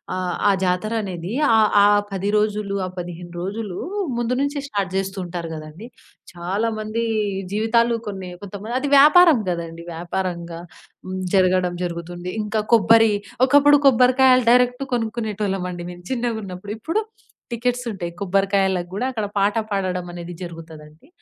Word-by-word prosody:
ఆహ్, 185 -1 -2
ఆ - - +6
జాతరనేది 185 -1 -2 0.2
ఆహ్, 215 -1 +5
ఆ - - +7 0.3
10 195 +1 -2
రోజులు 210 -1 -1
ఆ - - -6
15 175 0 -7
రోజులు 195 0 -4 0.4
ముందు 240 +1 0
నుంచే 285 0 -1
స్టార్ట్ 200 -6 -3
జేస్తూంటారు 180 -3 -4
గదండీ! 155 +8 -9 0.5
చాలా 190 +6 -2
మంది 215 +2 -2 0.5
జీవితాలు 230 +2 +2
కొన్ని 190 -2 -6
కొంతమంది 205 +5 -5
అది 285 - -1
వ్యాపారం 305 0 +7
గదండీ! 170 -1 -5
వ్యాపారంగా 170 0 -4 0.5
హ్మ్. 185 0 -4 0.2
జరగడం 185 -1 +2
జరుగుతుంది. 175 +1 -5
ఇంకా 215 +1 -1
కొబ్బరి 225 0 +5 0.4
ఒకప్పుడు 285 +1 +6
కొబ్బరికాయలు 255 0 +5
డైరెక్ట్ 250 +2 +2
కొనుక్కునేటోళ్ళమండి 205 -6 -3
మేం 175 0 -11
చిన్నగున్నప్పుడు. 215 -5 -3
ఇప్పుడు 330 - -1 0.5
టికెట్స్ 245 +1 -1
ఉంటాయి. 175 -5 -5
కొబ్బరికాయలకు 195 -2 +1
గూడా 205 +6 -2
అక్కడ 220 -4 -3
పాట 200 +2 +2
పాడడం 185 -3 -2
అనేది 175 0 -7
జరుగుతదండి. 160 - -10
195 Hz, 125 wpm, -22 LUFS, 180-230 Hz, 0.5 s, ఆ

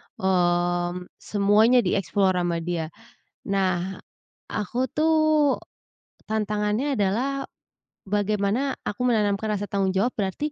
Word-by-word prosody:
mmm, 175 -1 +1 0.2
semuanya 215 +4 +4
di-explore 190 0 +1
sama 175 -1 0
dia. 165 -2 -2 0.6
Nah, 190 -1 0 0.5
Aku, 225 +5 -1
tuh, 310 -2 +3 0.7
tantangannya 215 +5 0
adalah 255 +8 0 0.6
bagaimana 205 +6 0
aku 250 +5 -1
menanamkan 215 -2 +1
rasa 205 - -3
tanggung 195 -1 0
jawab 225 +6 +2
berarti 210 +9 -2
205 Hz, 95 wpm, -25 LUFS, 190-240 Hz, 0.7 s, semuanya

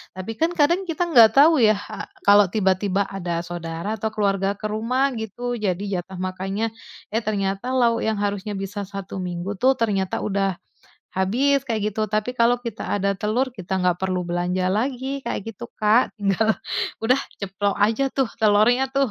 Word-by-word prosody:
Tapi 185 +4 -5
kan, 330 +2 +2
kadang 345 +6 +3
kita 350 -1 -2
nggak 230 -6 +8
tahu 295 -3 +6
ya, 215 0 +5
ha 205 - -7 0.2
kalau 200 -2 +6
tiba-tiba 195 -1 +1
ada 175 -3 -3
saudara 170 +4 -4
atau 220 +1 -3
keluarga 200 -2 +1
ke 215 - -2
rumah 235 +6 0
gitu, 240 +3 -4
jadi 195 -5 -1 0.2
jatah 185 +1 -10
makannya, 195 +4 -3 0.4
eh, 225 0 0
ternyata 200 +3 -2
lauk 235 -3 +2
yang 220 -2 0
harusnya 205 0 -2
bisa 205 +1 -4
1 195 -1 -7
minggu 175 +3 -4
tuh 260 +6 +2
ternyata 195 -4 0
udah 195 -2 -1 0.5
habis, 245 +10 +2
kayak 215 -3 -1
gitu. 215 +1 -1
Tapi, 215 +4 -2
kalau 235 +1 +5
kita 230 -3 -5
ada 200 -1 0
telur, 240 +6 0
kita 190 -4 -3
nggak 180 -1 +2
perlu 185 -1 -1
belanja 180 +1 -1
lagi, 260 +5 -1
kayak - - -2
gitu 200 - -8
Kak, 215 +4 +3
tinggal, 210 +1 +1 0.5
udah 255 +4 +3 0.2
ceplok 200 +1 -1
aja 225 +6 +2
tuh 265 -4 +1
telurnya 220 +4 +4
tuh, 275 -4 +2
210 Hz, 170 wpm, -23 LUFS, 190-235 Hz, 0.5 s, nggak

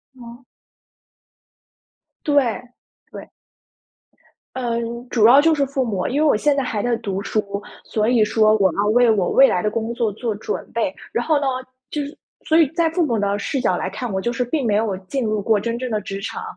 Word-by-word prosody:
哦。 240 0 -12 1.8
对， 280 -7 +2 0.5
对。 - - -10 1.3
嗯， 235 -1 -3
主 225 -2 +4
要 265 +4 +8
就 325 +1 +4
是 285 -2 +1
父 270 -2 -1
母， 195 -5 -2
因 285 +4 0
为 310 - +4
我 280 - +4
现 290 +6 +2
在 275 - +1
还 215 -4 -2
在 245 -1 0
读 195 -4 -4
书， 200 -1 -2 0.2
所 215 0 -1
以 230 -4 +4
说 215 0 +3
我 190 -4 +2
要 205 +1 +1
为 240 +1 +4
我 200 -4 +2
未 270 0 +6
来 180 - 0
的 210 - 0
工 230 +2 -3
作 230 -3 -1
做 225 0 -3
准 210 - -4
备。 225 -5 -1 0.2
然 240 - 0
后 310 -3 +2
呢， 280 - -2 0.5
就 300 - -2
是 285 - -9 0.3
所 320 - +4
以 320 -4 +5
在 330 0 +1
父 335 0 +1
母 235 -5 0
的 200 0 0
视 255 +5 -2
角 180 -7 +1
来 190 - -3
看， 220 +2 -5
我 190 - -1
就 240 +5 -2
是 250 - -1
并 265 +1 -2
没 210 -2 +2
有 210 -3 0
进 265 +4 -2
入 215 -2 -1
过 215 0 +2
真 235 +2 -3
正 255 0 -4
的 210 -1 -1
职 195 +1 -6
场， 450 - -5
235 Hz, 230 characters per minute, -21 LUFS, 210-265 Hz, 1.8 s, 要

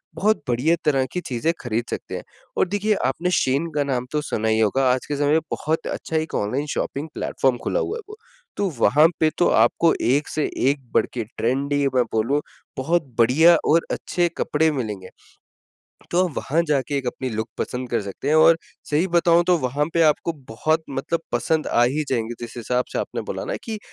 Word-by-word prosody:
बहुत 215 -1 +2
बढिया 130 +8 +2
तरह 135 -3 +3
की 180 - -3
चीजें 130 +4 -1
खरीद 120 -1 -2
सकते - - -5
हैं। - - -5 0.3
और - - +3
देखिए 205 +2 +1
आपने 170 +7 0
शेन 140 +6 +1
का 145 - +2
नाम 125 -3 -2
तो 150 0 0
सुना 110 -6 -2
ही 110 0 +2
होगा, 130 +5 +2
आज 130 - -3
के 145 - -3
समय 145 +1 +1
में 160 - +5
बहुत 160 +2 -2
अच्छा 160 - -4
एक 160 +1 -2
ऑनलाइन 125 +8 -1
शॉपिंग 145 +3 -3
प्लेटफॉर्म 130 -2 0
खुला - - 0
हुआ 445 - -2
है - - -7
वो। 430 - -10 0.4
तो 200 - +1
वहाँ 155 +2 +5
पे 160 - +4
तो 175 - +4
आपको 120 +9 +4
एक 140 +5 +2
से 155 - -2 0.3
एक 145 - 0
बढ़के 120 -2 0
ट्रेंडी 140 +5 0 0.2
मैं 125 - +4
बोलूँ 120 +7 +1 0.4
बहुत 165 +6 +1 0.2
बढ़िया 160 +9 +6
और 165 +2 +4
अच्छे 175 -1 0
कपड़े 160 +2 +2
मिलेंगे। 105 -9 -4 1.0
तो 180 +2 +3
आप 170 - -6
वहाँ 160 +5 +1
जाके 140 0 0
अपनी 130 +1 -3
लुक 110 +1 -3
पसंद 125 0 -3
कर 115 - +1
सकते 100 +7 -6
हैं 155 - +3
और 165 +1 +7 0.3
सही 155 +5 +2
बताऊँ, 170 0 +4
तो 180 -1 +4
वहाँ 140 +2 0
पे 170 - +4
आपको 160 +2 +2 0.2
बहुत 155 +8 0
मतलब 140 +5 -2
पसंद 155 +6 0
आ 120 - +3
ही 145 +5 0
जाएँगे 120 -2 -1
जिस 120 0 -8
हिसाब 125 +2 -1
से - - -2
आपने - - -3
बोला - - -4
न - - -2
कि 220 -2 -4
145 Hz, 200 wpm, -22 LUFS, 125-165 Hz, 1.0 s, और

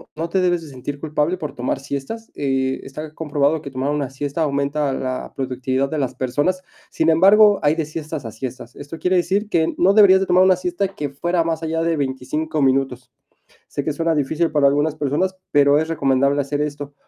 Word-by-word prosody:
no 165 +1 -3
te 190 - +1
debes 175 -2 +1
de 155 - -10
sentir 140 +2 -6
culpable 155 +3 -1
por 150 -4 -6
tomar 125 +2 -2
siestas. 140 +12 -6
Eh, 135 -1 -1
está 150 +3 -8
comprobado 150 0 0
que 140 - -7
tomar 135 +2 -2
una 145 -3 -2
siesta 140 +4 -4
aumenta 140 0 0
la 130 -1 -4
productividad 130 0 -1
de 155 - -2
las 130 -2 -2
personas. 145 +9 -1 0.3
Sin 160 0 +1
embargo, 200 +5 +6
hay 150 +1 +3
de 160 -2 -1
siestas 155 -2 -6
a 115 - -5
siestas. 125 +3 -8
Esto 145 +3 -8
quiere 180 +2 +1
decir 195 +5 0
que 160 -3 +1
no 190 +3 +4
deberías 195 -3 +7
de 195 - 0
tomar 185 0 +4
una 185 -1 +5
siesta 180 +2 -2
que 145 -2 -3
fuera 170 +5 0
más 165 -1 -2
allá 165 +1 -1
de 165 -1 +1
25 145 +3 -2
minutos. 130 -2 0 0.6
Sé 145 - -4
que 155 - -1
suena 165 +2 0
difícil 160 +3 0
para 150 -2 +3
algunas 145 +2 +1
personas, 155 +6 -1
pero 145 0 +4
es 160 +1 -1
recomendable 140 -2 +1
hacer 145 +1 -2
esto. 145 -1 -5
150 Hz, 205 wpm, -21 LUFS, 140-165 Hz, 0.6 s, deberías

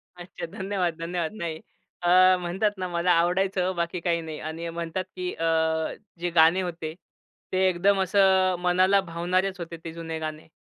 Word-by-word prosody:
अच्छा. 175 -1 -8
धन्यवाद, 190 -1 -2
धन्यवाद. 170 -1 -2
नाही. 165 -2 -4 0.4
अ, 175 - +2 0.3
म्हणतात 185 +4 0
ना 185 -1 -3
मला 175 +1 +1
आवडायचं 180 +2 +2
ओ, 185 - -2
बाकी 170 +1 -2
काही 170 -1 0
नाही. 160 -2 -7
आणि 165 +2 -5
म्हणतात 170 +2 -3
की 180 0 -3
अ, 165 - -3 0.7
जे 175 0 -1
गाणे 165 +3 +6
होते 165 -3 -4 0.6
ते 190 0 +3
एकदम 195 +2 +2
असं 190 -1 +3
मनाला 185 +2 +3
भावणारेच 180 +2 -1
होते, 170 0 -6
ते 165 - -6
जुने 165 -1 -5
गाणे. 155 0 -6
175 Hz, 165 wpm, -26 LUFS, 165-185 Hz, 0.7 s, गाणे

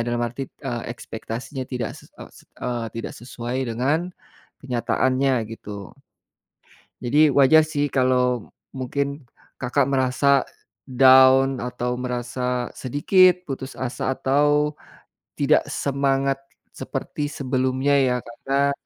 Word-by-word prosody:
dalam 120 0 -1
arti, 120 +3 -3
eee, 120 -4 -6
ekspektasinya 120 +3 -6
tidak 125 -4 -4
ses - - -18
eee, - - -9
s - - -17 0.2
eee, 120 -2 -2
tidak 115 -1 -5
sesuai 120 +1 -6 0.2
dengan 145 +10 0 0.5
kenyataannya 130 0 0
gitu. 105 -3 -8 1.1
Jadi 150 +5 +5
wajah 140 +4 +6
sih 145 -2 -1
kalau 125 -3 +1 0.3
mungkin 140 +2 -3 0.3
kakak 130 +2 +1
merasa 135 +1 +2 0.4
down 130 +1 +6
atau 125 0 -3
merasa 125 0 -2
sedikit 180 +7 +3
putus 135 -1 -5
asa 130 +1 -2
atau 145 +2 +2 0.6
tidak 145 +2 +3
semangat 135 0 0 0.4
seperti 145 - -4
sebelumnya 130 +1 0
ya 125 -2 +2
karena 135 +4 0
130 Hz, 110 wpm, -23 LUFS, 125-140 Hz, 1.1 s, wajah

